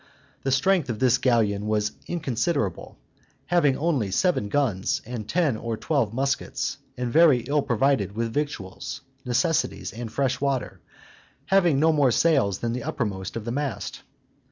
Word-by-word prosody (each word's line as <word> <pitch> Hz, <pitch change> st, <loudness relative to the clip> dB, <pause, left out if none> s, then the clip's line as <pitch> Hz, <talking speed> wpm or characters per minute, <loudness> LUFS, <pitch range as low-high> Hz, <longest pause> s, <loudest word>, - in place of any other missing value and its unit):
The 135 Hz, -, -1 dB
strength 155 Hz, +2 st, +2 dB
of 115 Hz, -, -2 dB
this 125 Hz, +1 st, +3 dB
galleon 110 Hz, -5 st, +1 dB
was 105 Hz, -1 st, +1 dB, 0.2 s
inconsiderable, 135 Hz, -, -2 dB, 0.5 s
having 155 Hz, -6 st, +3 dB
only 145 Hz, -, 0 dB
seven 105 Hz, -, +1 dB
guns, 110 Hz, -8 st, 0 dB
and 110 Hz, -3 st, -6 dB
ten 165 Hz, -8 st, +2 dB
or 115 Hz, 0 st, -4 dB
twelve 135 Hz, -8 st, 0 dB
muskets, 135 Hz, +3 st, -2 dB, 0.2 s
and 125 Hz, -1 st, -3 dB
very 155 Hz, -6 st, +6 dB
ill 145 Hz, +5 st, 0 dB
provided 125 Hz, -5 st, +1 dB
with 115 Hz, +1 st, -2 dB
victuals, 145 Hz, -11 st, -4 dB, 0.2 s
necessaries, 135 Hz, +7 st, 0 dB
and 115 Hz, 0 st, -6 dB
fresh 130 Hz, +1 st, 0 dB
water, 140 Hz, -3 st, -2 dB, 0.6 s
having 175 Hz, -7 st, +3 dB
no 160 Hz, +2 st, +4 dB
more 145 Hz, -4 st, +4 dB
sails 125 Hz, -, +2 dB
than 115 Hz, +2 st, -2 dB
the 125 Hz, -, -3 dB
uppermost 100 Hz, -6 st, -3 dB
of 115 Hz, -2 st, -5 dB
the 115 Hz, -, -2 dB
mainmast. 120 Hz, -9 st, -3 dB
125 Hz, 150 wpm, -25 LUFS, 110-145 Hz, 0.6 s, very